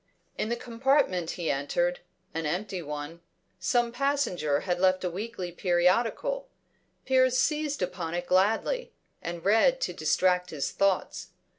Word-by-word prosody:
In 215 - -2
the 235 - 0
compartment 235 - +1
he 170 -3 0
entered, 175 +6 0 0.3
an 165 -1 -2
empty 185 +3 -3
one, 150 +2 -6 0.4
some 235 +6 +1
passenger 240 - 0
had 180 -2 -1
left 185 0 +3
a 180 - -1
weekly 190 -1 -5
periodical; 225 - +1 0.6
Piers 255 -1 +3
seized 300 - 0
upon 175 -2 -3
it 175 0 -2
gladly, 225 - +1 0.3
and 170 0 -6
read 225 - +4
to - - -1
distract 180 -1 +2
his 145 -3 -3
thoughts. 195 -2 0
185 Hz, 135 wpm, -28 LUFS, 175-245 Hz, 0.6 s, read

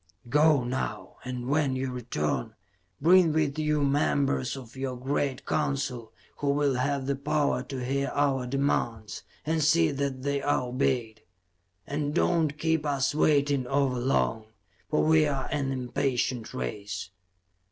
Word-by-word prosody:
"Go, 150 0 +4
now 125 +2 -4
and 125 -1 -5
when 145 -2 +1
you 130 0 -2
return, 120 -12 -2 0.4
bring 170 +2 +5
with 155 -1 0
you 150 -1 +1
members 140 -1 +1
of 125 -2 -11
your 130 -1 -3
great 135 +1 -2
Council 135 -6 -2 0.3
who 145 - -1
will 140 -1 +2
have 135 +1 -1
the 140 +1 0
power 145 +1 0
to 130 -3 -5
hear 140 +1 0
our 135 -3 +1
demands, 120 -5 -1 0.2
and 160 0 +1
see 160 +1 +4
that 135 -2 -3
they 140 0 0
are 145 -2 +1
obeyed. 125 -4 -1 0.6
And 145 +3 -2
do - - +3
not 160 -4 +1
keep 160 -1 +1
us 140 -2 0
waiting 145 -3 +2
over 135 -1 +1
long, 115 -3 0 0.4
for 155 - +2
we 155 -1 +4
are 135 -2 -2
an 140 -2 -1
impatient 125 -2 -1
race." 90 +9 -5
140 Hz, 145 wpm, -28 LUFS, 125-145 Hz, 0.6 s, bring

